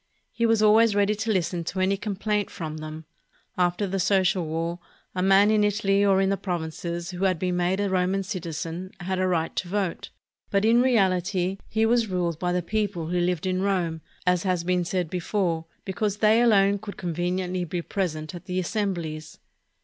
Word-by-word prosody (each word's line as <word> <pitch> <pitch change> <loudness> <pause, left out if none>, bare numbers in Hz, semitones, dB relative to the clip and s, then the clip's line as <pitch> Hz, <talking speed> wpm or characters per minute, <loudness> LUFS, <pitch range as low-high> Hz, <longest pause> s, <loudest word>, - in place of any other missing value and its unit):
He 235 0 +1
was 225 -1 +3
always 215 0 +5
ready 205 +1 +3
to 220 +2 -3
Hsten 175 -3 0
to 190 - -3
any 190 +1 +2
complaint 210 0 -2
from 155 -2 -6
them. 155 0 -7 0.5
After 180 +2 +1
the 195 0 -2
Social 190 -1 +2
War, 165 +2 -2 0.3
a 180 - -2
man 195 +2 +5
in 215 -1 +3
Italy 200 -1 +2
or 195 -1 +4
in 195 0 +2
the 200 - +1
provinces 170 -1 -4
who 180 +2 -2
had 185 -2 +2
been 180 +2 -1
made 180 +2 +1
a 205 - +1
Ro 185 -1 +1
man 195 +1 0
citizen, 175 -2 -5
had 185 +1 -2
a 185 - +2
right 165 -3 0
to 185 - -1
vote, 195 -2 -2 0.4
but 200 +1 +2
in 235 +2 +5
reahty 190 -5 +1
he 220 +1 +2
was 230 0 +3
ruled 175 -4 -1
by 180 -1 0
the 180 0 0
people 200 -4 -2
who 175 0 +1
Hved 175 0 0
in 185 0 0
Rome, 175 -5 0 0.2
as 180 -1 +3
has 180 -2 0
been 180 0 +1
said 180 0 -1
before, 175 -1 -1 0.2
because 205 +1 -1
they 215 +2 +4
alone 200 -4 +4
could 205 0 -8
conveniently 180 +1 -2
be 175 0 -3
present 155 -5 -3
at 175 - -9
the 180 0 -3
assembHes. 175 -6 -3
185 Hz, 195 wpm, -25 LUFS, 175-200 Hz, 0.5 s, always